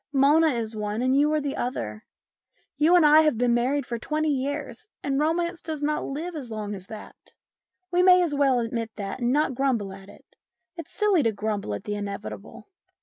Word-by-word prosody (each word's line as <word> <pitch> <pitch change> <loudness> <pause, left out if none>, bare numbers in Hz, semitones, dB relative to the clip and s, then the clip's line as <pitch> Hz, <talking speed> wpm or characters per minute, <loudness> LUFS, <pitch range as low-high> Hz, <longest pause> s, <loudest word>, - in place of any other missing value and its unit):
Mona 295 +4 +4
is 230 -6 -2
one, 210 +2 -3
and 255 +1 +2
you 295 +2 +3
are 310 - +2
the 285 -1 -3
other. 110 - -4 0.7
You 310 +5 +4
and 345 -3 +6
I 300 +1 +7
have 305 -7 +2
been 245 0 +2
married 255 +3 +1
for 235 -1 -4
twenty 310 +4 -1
years, 280 - -4 0.2
and 275 -1 0
romance 340 +3 0
does 310 -2 -5
not 300 +1 0
live 325 +5 -5
as 270 -6 -6
long 210 -2 -5
as 190 -1 -7
that. 215 -1 -12 0.6
We 355 0 +3
may 365 0 +6
as 325 -4 -1
well 275 -3 +3
admit 230 -1 -3
that 200 +3 -5
and 240 0 +1
not 295 0 +1
grumble 240 -7 -1
at 195 0 -13
it; - - -16 0.5
it's 335 -4 -8
silly 410 -5 +2
to 230 -4 +2
grumble 205 - -3
at - - -8
the 210 - -4
inevitable. 200 - -7
265 Hz, 205 wpm, -25 LUFS, 220-305 Hz, 0.7 s, I